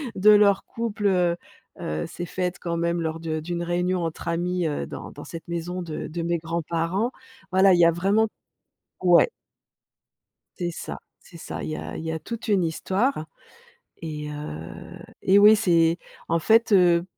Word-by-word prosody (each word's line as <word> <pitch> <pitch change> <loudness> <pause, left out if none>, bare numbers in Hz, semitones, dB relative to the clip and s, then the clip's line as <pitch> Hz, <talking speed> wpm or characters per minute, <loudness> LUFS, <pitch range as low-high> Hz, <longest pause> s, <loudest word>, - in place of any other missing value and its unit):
de 200 +3 +5
leur 205 -2 +6
couple, 225 -3 -2
heu, 180 -3 +2 0.5
heu, 75 0 -3
s'est 175 - -6
faite 180 +1 -3
quand 170 -1 -3
même 170 0 0
lors 160 0 -3
de 160 -1 -2
d'une 175 +2 -3
réunion 175 +1 0
entre 165 - -6
amis, 175 +1 0
heu, 145 - -2
dans - - -8
dans - - -10
cette 165 +1 -9
maison 175 +2 -3
de 160 -3 -5
de 170 +2 -4
mes 170 0 0
grands-parents. 170 +6 -1 0.4
Voilà 190 +1 +6
il 175 - +3
y 170 - +7
a 170 - +6
vraiment 195 +6 +2 0.8
ouais. 175 - +6 1.3
C'est 175 -2 -1
ça, 165 - -7 0.2
c'est 170 - -15
ça, 165 - -6
il - - -4
y 155 - -3
a - - -6
il - - -6
y 160 - -2
a 160 - -2
toute 230 +7 -7
une 195 -4 +3
histoire 190 - -1 0.7
et 150 -2 -5
heu 85 - -8 0.2
et 195 +1 +5
oui, 210 +1 +8
c'est, 170 -5 +3 0.3
en 165 - +2
fait, 225 +6 +3
heu, 175 -3 +5
175 Hz, 180 wpm, -25 LUFS, 165-190 Hz, 1.3 s, oui